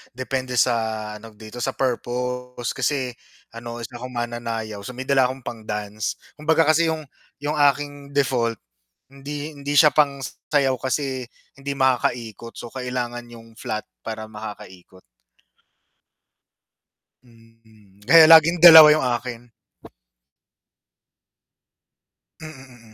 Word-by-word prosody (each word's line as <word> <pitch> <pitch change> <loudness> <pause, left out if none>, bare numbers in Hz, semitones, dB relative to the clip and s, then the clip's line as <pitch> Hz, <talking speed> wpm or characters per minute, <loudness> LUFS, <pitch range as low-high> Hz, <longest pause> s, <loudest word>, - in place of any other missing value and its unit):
depende 130 0 -4
sa 120 0 +3 0.4
ano 110 0 -14
dito 110 +3 -11
sa 120 - -3
purpose 125 -1 -3
kasi 130 0 -2 0.4
ano 115 0 -8
isa 120 +1 -9
akong 130 +1 -8
mananayaw, 115 -3 -4
so 125 - -8
may 130 - -5
dala 135 -1 +3
akong 130 0 -8
pang-dance 105 -2 -5 0.2
kumbaga 160 +2 +3
kasi 160 +2 +3
'yong 160 -1 -2 0.4
'yong 150 +1 -2 0.2
aking 145 0 -10
default, 120 -4 +1 0.6
hindi 145 +2 -7
hindi 145 0 -5
siya 150 0 +6
pang 140 -2 +1 0.2
sayaw 140 -3 +2
kasi 130 -1 -3 0.3
hindi 140 0 -5
makakaikot, 120 -3 -1
so 120 - -9
kailangan 125 -2 -5
'yong 115 -1 -15
flat 110 0 -4 0.2
para 110 -1 -7
makakaikot. 105 -4 -11 2.2
Mm, 115 -4 -24
kaya 165 -1 +8
laging 165 +1 +6
dalawa 160 -3 +11
yung 155 - -1
akin 120 -1 -4 2.9
Mm, 130 -7 -13
125 Hz, 115 wpm, -22 LUFS, 115-140 Hz, 2.9 s, dalawa